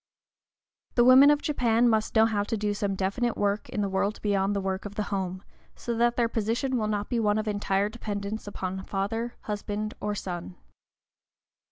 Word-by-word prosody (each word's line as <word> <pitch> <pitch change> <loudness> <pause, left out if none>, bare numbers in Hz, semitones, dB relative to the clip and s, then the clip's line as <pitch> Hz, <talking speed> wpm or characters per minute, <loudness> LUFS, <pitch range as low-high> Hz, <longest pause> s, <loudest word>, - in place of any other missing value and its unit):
The 240 - +5
women 260 +3 +8
of 295 0 +3
Japan 240 -5 +2
must 220 -1 +1
know 220 0 +6
how 215 -2 0
to 225 - -2
do 210 0 -1
some 200 -1 -1
definite 200 +5 -1
work 205 +1 0
in 210 - -2
the 200 - +1
world 195 +2 -1
beyond 200 -1 +1
the - - +1
work 190 -1 -2
of 205 0 -8
the 210 - -1
home, 185 -1 -3 0.3
so 235 - -4
that 235 +1 +2
their 235 -1 +2
position 230 +4 -1
will 220 -3 0
not 210 -1 -1
be 240 - 0
one 210 -1 +2
of 215 0 -2
entire 205 -1 0
dependence 210 -1 -5
upon 190 -1 -4
father, 225 +5 -2
husband, 210 0 -3
or 210 0 -1
son. 180 -2 -5
210 Hz, 190 wpm, -27 LUFS, 200-230 Hz, 0.3 s, women